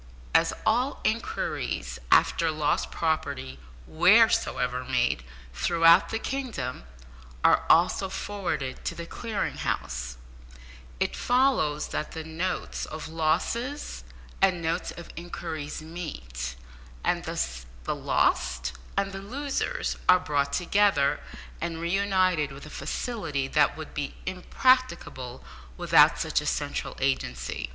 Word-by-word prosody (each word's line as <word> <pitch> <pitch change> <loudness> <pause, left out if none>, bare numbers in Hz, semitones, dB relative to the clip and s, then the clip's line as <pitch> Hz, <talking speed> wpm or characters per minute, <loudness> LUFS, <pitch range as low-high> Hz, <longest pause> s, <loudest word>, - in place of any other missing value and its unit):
As - - +4
all 245 +5 +2
inquiries 230 - -2
after 165 -1 +4
lost 150 -1 0
property, 140 - -2 0.3
wheresoever 125 - +4
made 125 - +1 0.3
throughout 165 - +5
the 225 - -1
kingdom, 225 - -4 0.6
are - - +5
also 180 +3 +4
forwarded 185 -11 -3
to - - -2
the 170 - -6
Clearing 220 +3 -3
House, 60 -3 -3 0.8
it - - 0
follows 245 - +2
that - - -3
the 160 - -5
notes 165 +4 -3
of 155 +1 -7
losses 170 - -1 0.4
and 185 -2 +4
notes 165 0 -1
of 170 - -9
inquiries 160 -3 -5
meet, 65 - -6 0.5
and - - 0
thus 60 0 -3 0.2
the - - -1
lost 60 -1 +1 0.3
and 195 0 +1
the 195 - -6
losers 275 +7 -2
are 185 0 +8
brought 145 -5 0
together 175 -4 +3 0.4
and 165 -1 -3
re 170 +1 -2
united 185 -6 +2
with 140 +2 -10
a 150 - -10
facility 165 - -3
that 140 - +3
would 155 - -8
be 145 -2 -3
impracticable 180 - +1 0.3
without - - +6
such - - 0
a - - -5
central - - -2
agency. 65 - -1
160 Hz, 120 wpm, -27 LUFS, 135-195 Hz, 0.8 s, are